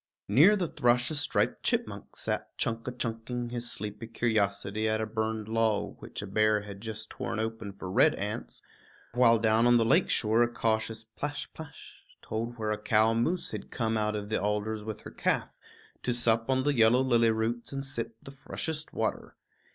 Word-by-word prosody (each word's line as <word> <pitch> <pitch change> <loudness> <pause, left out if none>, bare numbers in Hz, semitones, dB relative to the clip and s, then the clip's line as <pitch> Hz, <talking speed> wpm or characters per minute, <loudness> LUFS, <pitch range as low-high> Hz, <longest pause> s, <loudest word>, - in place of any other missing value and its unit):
Near 150 - +6
the 185 -4 0
thrush 120 -1 +2
a - - -2
striped 145 - +1
chipmunk - - -2
sat - - -3
chunk 115 0 -2
a - - -1
chunking 120 0 -3
his 120 0 -4
sleepy 105 +2 -6
curiosity 110 -2 0
at 110 0 +1
a 110 - 0
burned 110 0 -2
log 110 -2 0
which - - -7
a - - -4
bear 105 +1 +2
had 100 -1 -9
just 110 0 -5
torn - - -4
open 110 -2 -3
for 95 -1 -8
red 90 - +4
ants; - - -5 0.5
while 120 -1 +5
down 110 +1 +3
on 120 0 +6
the 115 - +3
lake 160 +10 +4
shore 110 +1 +3
a 120 - +5
cautious 110 -1 -1
plash 145 +6 -5
plash 160 -2 -11 0.2
told 115 +2 -4
where 110 -1 -1
a 105 - -2
cow 110 +1 +3
moose 155 +11 0
had - - -6
come 115 -2 -1
out 105 0 0
of 105 0 -4
the 110 - 0
alders 105 +1 -1
with 110 -1 -6
her - - -9
calf - - 0 0.5
to 125 - 0
sup 115 0 +2
on 130 0 +2
the 145 +1 +2
yellow 120 0 +5
lily 120 -3 +4
roots 115 +2 -1
and 135 0 -4
sip 115 -3 -4
the 135 - -9
freshest 155 +3 -5
water. - - -2
115 Hz, 190 wpm, -29 LUFS, 110-120 Hz, 0.5 s, Near